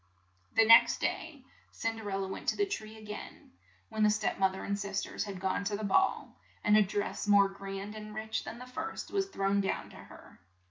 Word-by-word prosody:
The 225 Hz, -, +6 dB
next 230 Hz, +1 st, +7 dB
day, 295 Hz, -5 st, -3 dB, 0.3 s
Cin 225 Hz, 0 st, -3 dB
der 215 Hz, -2 st, -6 dB
el 195 Hz, 0 st, -1 dB
la 190 Hz, -, -2 dB
went 190 Hz, -, -3 dB
to -, -, +1 dB
the 405 Hz, -, +3 dB
tree 220 Hz, -, -6 dB
a 220 Hz, -, -13 dB
gain, 210 Hz, 0 st, -9 dB, 0.4 s
when 220 Hz, -, -3 dB
the 210 Hz, -, +6 dB
step 210 Hz, -1 st, 0 dB
moth 190 Hz, -1 st, +3 dB
er -, -, -6 dB
and 200 Hz, 0 st, -2 dB
sis 200 Hz, -1 st, -2 dB
ters -, -, -4 dB
had 195 Hz, -3 st, -6 dB
gone 190 Hz, +1 st, -1 dB
to 205 Hz, 0 st, -1 dB
the 215 Hz, -, -6 dB
ball, 210 Hz, -, +1 dB, 0.2 s
and 210 Hz, 0 st, +5 dB
a 215 Hz, -, +7 dB
dress 205 Hz, +1 st, -2 dB
more 200 Hz, -1 st, +6 dB
grand 195 Hz, +1 st, -6 dB
and 215 Hz, 0 st, -8 dB
rich 220 Hz, 0 st, -3 dB
than 230 Hz, -, -7 dB
the 250 Hz, -, -9 dB
first 320 Hz, +6 st, -6 dB
was 390 Hz, -1 st, 0 dB
thrown 195 Hz, -, +1 dB
down 195 Hz, -, -2 dB
to -, -, -14 dB
her. -, -, -14 dB
210 Hz, 230 wpm, -31 LUFS, 195-225 Hz, 0.4 s, next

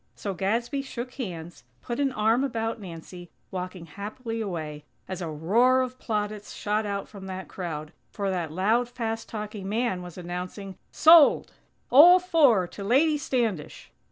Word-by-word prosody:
So 200 Hz, -, -4 dB
Gadsby 230 Hz, -, -1 dB
shook 250 Hz, -2 st, -7 dB
hands, 175 Hz, -, -7 dB, 0.2 s
put 240 Hz, +1 st, -4 dB
an 275 Hz, -1 st, +2 dB
arm 225 Hz, +2 st, +2 dB
about 225 Hz, -4 st, -2 dB
Nancy, 175 Hz, -1 st, -10 dB, 0.2 s
walking 180 Hz, -1 st, -5 dB
happily 220 Hz, +6 st, -6 dB
away, 155 Hz, -7 st, -5 dB, 0.2 s
as 185 Hz, -1 st, -5 dB
a 170 Hz, -, -3 dB
roar 225 Hz, +12 st, +3 dB
of 255 Hz, 0 st, -6 dB
plaudits 210 Hz, -2 st, -3 dB
shot 210 Hz, +1 st, -1 dB
out 200 Hz, -1 st, -3 dB
from 195 Hz, -2 st, -10 dB
that 190 Hz, 0 st, -6 dB
crowd, 160 Hz, -4 st, -6 dB, 0.2 s
for 200 Hz, -2 st, -2 dB
that 175 Hz, -4 st, -2 dB
loud, 220 Hz, +8 st, +1 dB
fast 225 Hz, -2 st, -4 dB
talking 210 Hz, -3 st, -6 dB
man 220 Hz, -4 st, 0 dB
was 180 Hz, -1 st, -10 dB
announcing: 180 Hz, +2 st, -6 dB, 0.2 s
"_Sold! 320 Hz, -2 st, +6 dB, 0.4 s
All 330 Hz, +8 st, +9 dB
four 290 Hz, -, +4 dB
to 200 Hz, -, -8 dB
Lady 295 Hz, +8 st, +3 dB
Standish!! 230 Hz, -, -2 dB
210 Hz, 155 wpm, -26 LUFS, 180-245 Hz, 0.4 s, All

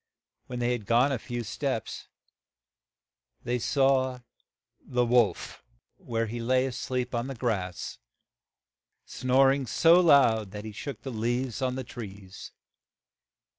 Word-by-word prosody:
When 125 Hz, -, -6 dB
they 120 Hz, 0 st, 0 dB
had 115 Hz, -5 st, -3 dB
gone 120 Hz, +4 st, +4 dB
a 130 Hz, -, -1 dB
few 120 Hz, +1 st, -5 dB
steps 115 Hz, 0 st, -4 dB, 1.4 s
they 125 Hz, +1 st, -1 dB
saw 130 Hz, -1 st, +1 dB, 0.6 s
the 125 Hz, -1 st, 0 dB
wolf, 115 Hz, -6 st, +1 dB, 0.3 s
where 115 Hz, -1 st, -2 dB
he 115 Hz, +2 st, -5 dB
lay 130 Hz, +2 st, +2 dB
a 135 Hz, -, -2 dB
sleep 125 Hz, 0 st, -3 dB
on 120 Hz, +1 st, -1 dB
the 135 Hz, -, -5 dB
grass, 100 Hz, -7 st, -3 dB, 1.1 s
snor 135 Hz, +1 st, +3 dB
ing 135 Hz, -2 st, -3 dB
so 165 Hz, -, +5 dB
loud 125 Hz, -, +4 dB
that 105 Hz, +1 st, -7 dB
he 110 Hz, -, -6 dB
shook 135 Hz, +4 st, -7 dB
the 135 Hz, -, -5 dB
leaves 120 Hz, +2 st, -2 dB
on 130 Hz, -1 st, 0 dB
the 130 Hz, -, -4 dB
trees. 100 Hz, -6 st, -10 dB
125 Hz, 135 wpm, -28 LUFS, 115-130 Hz, 1.4 s, so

